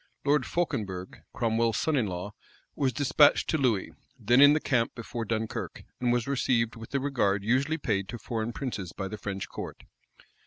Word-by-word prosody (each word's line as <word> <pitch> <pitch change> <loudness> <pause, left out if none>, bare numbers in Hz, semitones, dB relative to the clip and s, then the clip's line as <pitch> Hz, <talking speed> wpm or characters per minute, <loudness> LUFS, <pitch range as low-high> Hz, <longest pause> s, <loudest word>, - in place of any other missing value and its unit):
Lord 145 -2 +2
Fauconberg, 100 - -3
Cromwell's 115 -1 +1
son 160 - +1
in 120 -6 +1
law, 90 +2 -5 0.4
was 135 -3 +1
despatched 145 +3 +4
to 160 - +1
Louis, 115 -8 +1 0.3
then 120 +4 +4
in 145 +1 +9
the 155 - +2
camp 125 -6 0
before 115 -1 -5
Dunkirk; 110 0 -3 0.2
and 125 -1 +1
was 120 -1 +1
received 125 -4 +1
with 115 0 -10
the 140 - 0
regard 110 -8 +1
usually 135 +8 +1
paid 100 -9 -1
to 120 - -5
foreign 115 +1 -3
princes 110 -9 -5
by 95 - -4
the 105 +2 -7
French 100 -1 -4
court. - - -8
115 Hz, 180 wpm, -28 LUFS, 105-135 Hz, 0.4 s, in